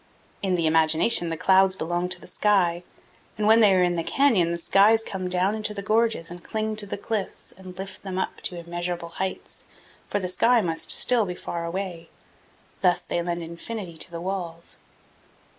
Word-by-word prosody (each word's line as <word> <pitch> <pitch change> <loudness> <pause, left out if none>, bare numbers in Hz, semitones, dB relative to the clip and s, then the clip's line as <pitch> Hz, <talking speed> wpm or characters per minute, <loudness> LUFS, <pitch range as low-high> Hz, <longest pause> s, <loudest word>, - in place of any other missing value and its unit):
In 190 -2 +1
the 170 -2 0
imagination 160 +3 +3
the 165 - -3
clouds 190 +2 +4
belong 175 +1 -2
to 180 -1 -1
the - - -13
sky, 180 -5 +2 0.6
and 210 - -1
when 220 +2 +6
they 210 -3 +6
are 180 - +4
in 175 0 +2
the 165 - -1
canyon 230 -11 +3
the 170 - -1
skies 205 +6 +4
come 185 -4 -4
down 185 +2 +1
into 215 -1 -2
the 200 - -5
gorges 220 -6 +1
and 175 -1 -9
cling 215 0 -2
to 205 -1 -2
the - - -4
cliffs 205 -1 -3
and 185 -1 -12
lift 190 0 -7
them 190 -1 -5
up 190 - -3
to 180 - -2
immeasurable 175 0 -4
heights, 190 0 -4 0.4
for 205 - 0
the 185 - -2
sky 235 +6 +3
must 165 -5 -2
still 245 -3 +4
be 180 - -4
far 170 -1 -5
away. 175 -1 -5 0.7
Thus 180 -2 +3
they 170 - -2
lend 170 0 -3
infinity 170 +2 -7
to - - -4
the 170 -1 -6
walls. 175 -3 -5
185 Hz, 195 wpm, -25 LUFS, 170-205 Hz, 0.7 s, when